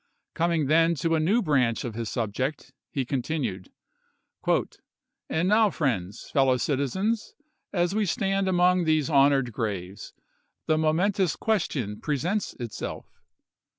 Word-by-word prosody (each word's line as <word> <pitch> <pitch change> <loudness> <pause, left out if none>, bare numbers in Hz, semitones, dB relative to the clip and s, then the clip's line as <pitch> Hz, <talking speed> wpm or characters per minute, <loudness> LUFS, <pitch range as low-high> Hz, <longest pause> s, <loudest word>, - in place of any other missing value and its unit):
Coming 165 -2 +1
then 165 +3 +4
to 165 +2 0
a 160 - +3
new 200 +10 +2
branch 130 -8 +1
of 120 - -4
his 115 0 -4
subject, 130 +5 -3 0.2
he 135 -2 -2
continued: 130 - -3 0.4
" - - -31 0.8
And 165 +3 0
now, 215 +1 +4
friends, 105 - -2
fellow 135 -2 +3
citizens, 170 - -1 0.4
as 175 -1 +1
we 210 -1 +1
stand 195 -1 0
among 180 -1 +3
these 155 -1 +1
honored 135 -3 +4
graves, 100 -3 -5 0.5
the 155 0 +2
momentous 180 +3 +1
question 135 - -1
presents 170 - -1
itself. 120 -4 -7
155 Hz, 125 wpm, -26 LUFS, 125-180 Hz, 0.8 s, then